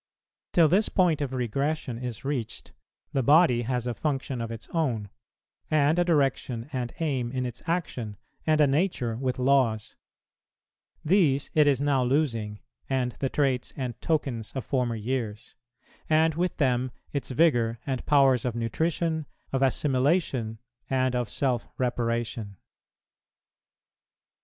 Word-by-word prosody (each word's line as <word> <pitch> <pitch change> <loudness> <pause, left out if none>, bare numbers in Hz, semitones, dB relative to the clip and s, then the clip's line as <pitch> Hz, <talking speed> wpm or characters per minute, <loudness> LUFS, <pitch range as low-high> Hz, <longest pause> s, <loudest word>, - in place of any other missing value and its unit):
Till 165 -2 +6
this 195 +7 +3
point 175 -5 +2
of 140 -2 -2
regression 130 +1 -2
is 125 -1 -6
reached, 135 -6 -3 0.4
the 135 - +2
body 140 -2 +5
has 125 0 -1
a 120 - -1
function 135 +1 -2
of 115 - -4
its 115 -1 -7
own, 120 - -1 0.6
and 155 +2 +3
a - - +5
direction 135 -7 0
and 125 -2 -2
aim 135 -7 -1
in 130 -1 -2
its 120 -1 -6
action, 125 - -2 0.3
and 155 -1 +3
a 150 - +7
nature 140 -5 0
with 130 +1 -2
laws; 125 -5 +2 1.1
these 150 -6 +3
it 150 -2 +5
is 140 -2 +3
now 140 -3 +2
losing, 120 -6 0 0.3
and 130 -2 0
the 135 - 0
traits 135 -4 0
and 125 -4 -4
tokens 135 -8 -1
of 130 - -4
former 125 -3 0
years; 115 -1 -3 0.6
and 160 +1 +4
with 175 +3 -1
them 130 -2 +1 0.2
its 140 - -2
vigour 120 -5 +2
and 130 -3 -2
powers 135 -4 +4
of 125 -2 -2
nutrition, 160 +6 -1 0.3
of 135 - +1
assimilation, 130 -3 +1 0.3
and 130 -1 +1
of 120 -3 -1
self 125 -2 -1
reparation. 115 -4 -2
130 Hz, 135 wpm, -27 LUFS, 120-150 Hz, 1.1 s, a